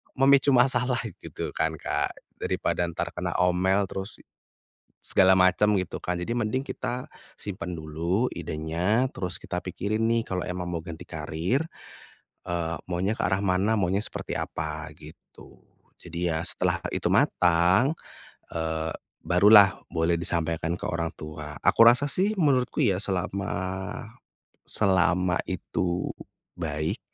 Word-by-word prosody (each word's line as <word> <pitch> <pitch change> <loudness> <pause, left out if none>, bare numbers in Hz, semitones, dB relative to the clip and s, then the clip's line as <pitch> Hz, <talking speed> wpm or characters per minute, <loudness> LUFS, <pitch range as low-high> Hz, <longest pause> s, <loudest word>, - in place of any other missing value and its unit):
memicu 135 0 +5
masalah, 125 -1 +3 0.2
gitu - - -6
kan, 80 0 -1
Kak? - - -2 0.2
Daripada 85 - -1
ntar 85 - -4
kena - - -4
omel 90 +2 +2
terus, 95 +1 -5 0.9
segala 95 0 +5
macam 100 +3 +4
gitu 95 -1 -2
kan? 90 - -2
Jadi 90 +6 -4
mending 120 +3 0
kita 125 -2 -5 0.2
simpan 90 -3 -5
dulu 85 +9 -1
idenya, 90 - -1
terus 90 -2 -3
kita 90 - -4
pikirin 100 +4 -3
nih 115 0 +2
kalau 90 -4 -3
emang 90 -1 -4
mau 85 - -2
ganti 80 -1 -8
karir, 85 - -2 0.9
eee, 85 -1 -2
maunya 95 +5 -1
ke - - -2
arah 95 0 +1
mana, 100 +2 +1
maunya 95 +3 +1
seperti - - -4
apa, 75 0 -4
gitu. 80 +2 -15 0.4
Jadi 85 0 -2
ya, 80 - -1
setelah - - +1 0.2
itu - - 0
matang, 90 - +4 0.6
eee, 80 -1 -2 0.4
barulah 100 +2 +6
boleh 85 0 +2
disampaikan 85 -1 -1
ke - - -9
orang 85 -1 -2
tua. 75 -1 -8
Aku - - +2
rasa 125 +4 +4
sih 195 +8 +1
menurutku 130 -5 +2
ya, 95 - +3
selama, 95 0 -2 1.2
selama 90 -2 +2
itu 90 0 -2 0.5
baik 75 -2 -2
90 Hz, 130 wpm, -26 LUFS, 85-105 Hz, 1.2 s, barulah